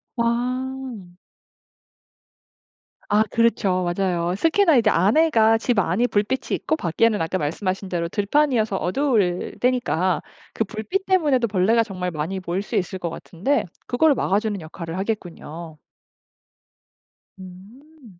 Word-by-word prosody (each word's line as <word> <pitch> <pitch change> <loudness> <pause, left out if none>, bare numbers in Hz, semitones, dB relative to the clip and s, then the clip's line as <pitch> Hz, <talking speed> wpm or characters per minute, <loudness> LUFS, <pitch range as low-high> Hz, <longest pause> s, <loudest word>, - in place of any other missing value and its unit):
와. 245 -4 -2 1.9
아 210 +1 +3
그렇죠. 200 -6 +1
맞아요. 175 -1 0
특히나 325 - +4
안에가 225 - +4
집 240 0 0
안이 200 +5 +2
불빛이 210 +4 -1
있고 315 - -1
밖에는 210 - +1
아까 165 +3 -1
말씀하신 185 +5 -2
대로 170 -2 -2
들판이어서 220 - +1
어두울 195 -4 0
때니까 240 -8 +1 0.3
그 - - 0
불빛 225 - -3
때문에도 295 -10 +2
벌레가 215 +3 +3
정말 185 -4 -4
많이 165 +4 -3
모일 180 +3 -2
수 - - -6
있을 190 +1 -1
것 175 -2 -3
같은데 250 - -1 0.2
그걸 285 +4 +3
막아주는 205 -1 0
역할을 165 +1 -7
하겠군요. 170 -5 -5 1.6
음. 210 - -14
210 Hz, 265 characters per minute, -22 LUFS, 180-245 Hz, 1.9 s, 특히나